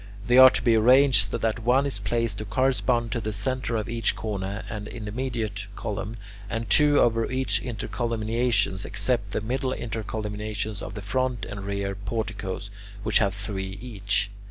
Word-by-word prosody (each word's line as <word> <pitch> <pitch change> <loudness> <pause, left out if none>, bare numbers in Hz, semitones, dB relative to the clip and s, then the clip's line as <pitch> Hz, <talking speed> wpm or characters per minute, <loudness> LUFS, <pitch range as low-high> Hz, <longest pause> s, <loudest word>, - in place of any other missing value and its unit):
They 125 +1 +5
are 130 0 +11
to - - -2
be 120 - +4
arranged 120 -2 +5
so 115 - -2
that 115 -1 -1
one 125 +5 +3
is 135 -7 -1
placed 115 +3 -1
to 110 - -4
correspond 125 -1 +1
to 115 - -1
the 110 - -3
centre 120 +4 -2
of 110 +1 -2
each 115 0 +1
corner 100 -1 -4
and 105 -1 -6
intermediate 110 -2 -4
column, 105 +1 -4 0.3
and 115 0 -3
two 150 -1 +6
over 115 -1 +2
each 130 -6 +1
intercolumniation 115 -2 -1
except 120 -6 0
the 105 - -2
middle 130 +4 -1
intercolumniations 105 -2 -4
of - - -7
the 105 - -6
front 125 +1 -1
and 100 -1 -7
rear 100 -1 -2
porticoes, 100 -1 -4 0.3
which - - +4
have 100 -3 +1
three 95 -1 -4
each. 105 -3 -1
110 Hz, 165 wpm, -26 LUFS, 100-120 Hz, 0.3 s, are